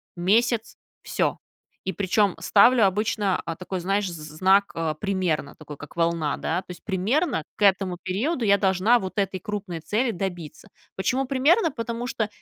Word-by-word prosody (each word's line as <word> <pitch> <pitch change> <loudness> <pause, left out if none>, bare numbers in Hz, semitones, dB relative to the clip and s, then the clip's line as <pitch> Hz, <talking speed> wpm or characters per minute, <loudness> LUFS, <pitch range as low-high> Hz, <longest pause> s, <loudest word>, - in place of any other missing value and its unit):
месяц, 225 +6 +1 0.3
всё. - - -1 0.5
И 190 - -1
причем 200 +1 +1
ставлю 235 +2 +5
обычно, 205 -1 0
а, 165 -1 -4
такой, 185 0 -5
знаешь, 195 +3 0
з - - -7
з 155 0 -10
знак 195 +2 +4 0.3
~ 185 -7 -1
такой, 150 -2 -10
как 150 - -12
волна, 165 -3 0
да, 175 +3 -2
то - - -29
есть 180 - -11
примерно 215 - 0
к - - -19
этому 190 -2 +3
периоду 230 - -1
я 200 -1 +4
должна 195 +4 +3
вот 190 -1 -4
этой 195 -1 -1
крупной 195 -4 -5
цели 230 +8 0
добиться. 175 -6 -5 0.3
Почему 255 +8 0
примерно? 290 - +3
Потому 235 0 -4
что 220 -4 -1
195 Hz, 165 wpm, -24 LUFS, 180-230 Hz, 0.5 s, ставлю